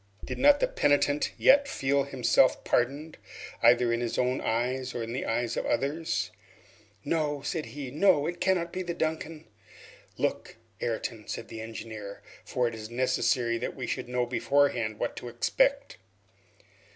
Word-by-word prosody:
Did - - -5
not 285 +2 +6
the - - +2
penitent 145 - +2
yet 280 +1 +5
feel 140 - 0
himself 130 -1 +3
pardoned, 140 +6 -1 0.4
either 120 0 +5
in 115 - -1
his 120 - -2
own 125 +1 +1
eyes 125 +3 -1
or 120 - -2
in 115 +1 -5
the 130 - -3
eyes 115 +1 -1
of - - -2
others? 140 -3 -1 0.7
"No," 150 -2 -1
said 160 +1 -3
he, 140 -3 -7
"no! 150 -1 +3
it 175 +2 -4
cannot 180 -3 +1
be 185 - -2
the 175 -2 -4
'Duncan'!" 160 0 -3 0.7
"Look, - - -2 0.3
Ayrton," 115 0 -2
then 105 - -18
said 115 - -6
the 110 - -7
engineer, 110 -2 -8 0.2
"for 125 -1 0
it 115 - -4
is 110 -1 -7
necessary 120 -1 +1
that 125 - -4
we 130 - -4
should 120 - -4
know 125 0 0
beforehand 125 -3 +1
what 120 - -3
to - - -6
expect." - - +1
130 Hz, 165 wpm, -28 LUFS, 120-155 Hz, 0.7 s, not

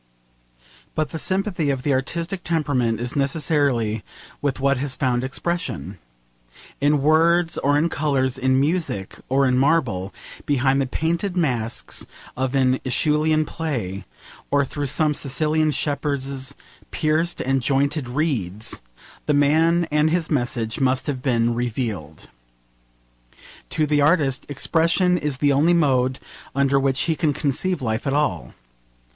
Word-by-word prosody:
But 155 -2 -1
the 160 - -4
sympathy 185 -5 0
of 135 -2 -1
the 145 - +1
artistic 170 +8 -2
temperament 130 -9 0
is 120 +4 -3
necessarily 140 -6 +1 0.4
with 140 -2 -1
what 140 0 +2
has 135 0 -2
found 125 -3 0
expression. 135 - -3 0.8
In 145 0 +2
words 165 +2 +3
or 145 +1 +2
in 155 +3 +2
colours, 135 -5 0
in 130 0 +2
music 150 - -1
or 135 +1 +3
in 125 -1 +2
marble, 130 - +1 0.4
behind 135 -1 +2
the 135 - -1
painted 170 +7 -1
masks 120 -8 -1 0.3
of 130 +1 -2
an 130 -1 +3
AEschylean 155 +3 +2
play, 120 - -4 0.5
or 140 -1 +2
through 145 +1 -4
some 150 +3 +2
Sicilian 155 +3 0
shepherds' 140 -3 -2 0.3
pierced 160 +3 0
and 135 0 0
jointed 140 +1 0
reeds, 120 - -2 0.5
the 150 - +3
man 160 +4 +3
and 150 +1 +3
his 165 0 -1
message 120 -5 -1
must 130 -1 +1
have 140 -4 -3
been 120 -3 +1
revealed. 110 - -4 1.4
To 155 - +1
the 150 -1 +2
artist, 145 -3 +2
expression 170 +5 +2
is 145 -3 -2
the 145 +1 +2
only 160 +6 +4
mode 130 -5 +2 0.4
under 140 0 +3
which 135 -1 +1
he 165 - +1
can 155 -2 +1
conceive 150 +4 -1
life 110 +2 -2
at 135 - 0
all. 90 - -1
140 Hz, 135 wpm, -22 LUFS, 130-155 Hz, 1.4 s, only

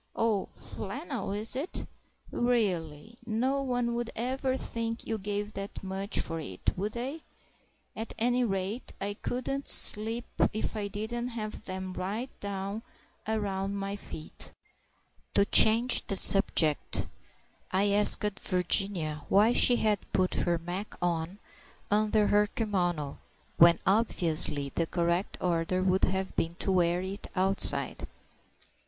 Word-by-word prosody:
Oh, 220 -4 0
flannel 270 - -6
is 210 +4 0
it?... 290 +8 -3 0.5
Really! 210 -5 -1
no 250 +5 -1
one 245 -3 -1
would 240 0 -3
ever 260 +3 -2
think 230 -2 -5
you 225 -1 -3
gave 205 +1 -4
that 195 0 -7
much 195 +2 -2
for 165 0 -5
it, 95 - -3
would 205 +3 -3
they? 265 +7 -5 0.7
At 225 +1 -7
any 245 +2 +1
rate 195 +2 -3
I 200 +1 -3
couldn't 255 +5 -4
sleep 225 +3 +4 0.3
if 215 +1 -3
I 210 -2 -3
didn't 220 +4 -4
have 220 -3 -6
them 185 0 -6
right 210 +8 -4
down 200 +1 -5 0.5
around 200 -2 -2
my 200 0 -4
feet." 160 -5 -7 0.8
To 200 - +4
change 230 +4 +5
the 195 - -1
subject 170 -6 +5 0.7
I 200 +2 +2
asked 205 +1 +8 0.2
Virginia 180 -4 +1
why 210 +4 +4
she 245 - +6
had 215 -4 +1
put 185 -1 +1
her 175 -1 0
mac. 175 +5 -6
on 175 +1 -2 0.5
under 215 0 +2
her 210 0 +3
kimono, 175 - -2 0.4
when 170 0 +7
obviously 160 -8 +1
the 165 - -1
correct 170 +2 -1
order 180 +1 -1
would 190 0 +2
have 190 0 -3
been 165 +1 -2
to 190 - -2
wear 175 -1 +1
it 195 +2 -7
outside. 190 +1 +1
200 Hz, 130 wpm, -29 LUFS, 185-230 Hz, 0.8 s, asked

